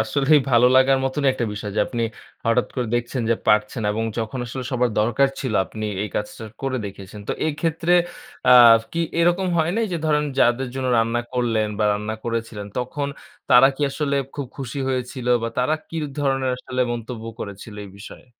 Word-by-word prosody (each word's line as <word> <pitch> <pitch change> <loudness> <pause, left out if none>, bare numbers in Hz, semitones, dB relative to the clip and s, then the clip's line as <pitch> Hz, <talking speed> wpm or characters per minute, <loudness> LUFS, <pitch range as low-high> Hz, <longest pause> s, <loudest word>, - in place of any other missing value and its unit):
আসলেই 140 +7 +3
ভালো 120 0 +6
লাগার 130 0 +5
মতনই 135 +1 +1
একটা 125 - -2
বিষয় 105 0 -5
যে, - - +3
আপনি 120 -2 -3 0.4
হঠাৎ 115 +2 +2
করে 125 -2 -1
দেখছেন 120 +1 -1
যে, - - +5
পারছেন 105 +2 +2
এবং 115 +1 -2
যখন 115 +3 -3
আসলে 125 +1 -5
সবার 125 -1 +1
দরকার 120 +5 +3
ছিল 130 -5 -2
আপনি 110 -1 -6 0.2
এই 105 - -3
কাজটা 105 +2 -4 0.2
করে 135 -1 -1
দেখেছেন। 100 +1 -10
তো - - +1 0.2
এক্ষেত্রে 165 +3 -1 0.6
আ - - +7 0.4
কি 170 - -1 0.2
এরকম 175 +2 +2
হয় 160 +1 +2
নাই? 230 - +2
যে, - - 0
ধরেন 150 -1 +2
যাদের 120 +2 +3
জন্য 130 -1 -2
রান্না 115 +1 +1
করলেন 115 -4 +1
বা - - +1
রান্না 105 +2 -3
করেছিলেন, 115 -3 -3
তখন 140 +3 -3 0.4
তারা 125 +2 +8
কি - - -11
আসলে 140 0 -1 0.2
খুব 140 -3 -4
খুশি 135 0 -5
হয়েছিল 125 -1 -3 0.2
বা 115 - -1
তারা 150 +5 +2
কি 165 - -7 0.2
ধরনের 135 -2 +1
আসলে 130 0 -4
মন্তব্য 115 -1 -6 0.2
করেছিল 100 +2 -7
এই 100 - -10
বিষয়ে? 105 +5 -12
125 Hz, 185 wpm, -22 LUFS, 115-135 Hz, 0.6 s, তারা